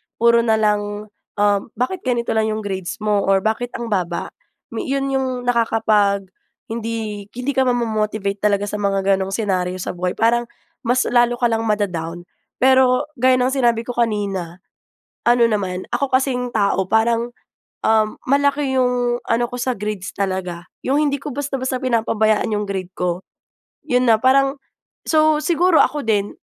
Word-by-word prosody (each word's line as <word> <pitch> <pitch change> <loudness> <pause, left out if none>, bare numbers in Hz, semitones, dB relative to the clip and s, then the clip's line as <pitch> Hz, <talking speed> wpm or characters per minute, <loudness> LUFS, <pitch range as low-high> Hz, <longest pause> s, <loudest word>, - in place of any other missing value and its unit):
puro 235 0 +4
na 230 -1 +2
lang, 210 -1 -1 0.2
um, 205 -1 +2
bakit 255 - -2
ganito 240 -2 0
lang 220 0 +1
'yong 215 0 -2
grades 190 -2 -4
mo, 210 -1 +2
or 195 -1 +3
bakit 225 +3 0
ang 235 -1 -5
baba? 180 -3 -2 0.4
Mi 230 - -4
'yon 275 0 -1
'yong 265 -1 0
nakakapag 220 -4 +2 0.5
hindi 225 -3 -4
hindi 250 +3 -2
ka 265 -2 +1
mamomo-motivate 215 -4 -1
talaga 205 -1 +1
sa 205 +1 -4
mga 195 -1 0
ganong 195 0 +1
senaryo 185 -4 -1
sa 185 - -4
buhay 180 0 -2
parang 235 +1 +2 0.4
mas 250 +1 +3
lalo 240 0 +3
ka 240 -1 +1
lang 225 0 0
mada-down. 175 -5 -2 0.3
Pero 260 +2 +3
gaya 255 +1 +5
ng 255 +1 +1
sinabi 235 -4 +1
ko 245 - -5
kanina 200 -7 -2 0.6
ano 240 -1 +4
naman 190 -4 -2
ako 275 -2 -2
kasing 250 -2 0
tao 200 -3 +1
parang, 230 +3 +1 0.5
um, 220 -1 +2
malaki 280 0 +1
'yong 245 -1 +1
ano 235 +1 +2
ko 245 0 -5
sa 255 -1 -1
grades 205 -2 -5
talaga, 185 -3 -3 0.2
'yong 270 +2 0
hindi 285 -1 -1
ko - - -6
basta-basta 270 -1 -3
pinapabayaan 225 -3 +1
'yong 210 - -1
grade 190 -2 -4
ko. 180 0 -1 0.7
'Yon 250 -1 +2
na 225 - +6
parang 270 +4 +3 0.5
so 310 -1 +3
siguro 340 +1 +3
ako 295 -1 +2
din 205 -2 0
225 Hz, 160 wpm, -20 LUFS, 200-250 Hz, 0.7 s, na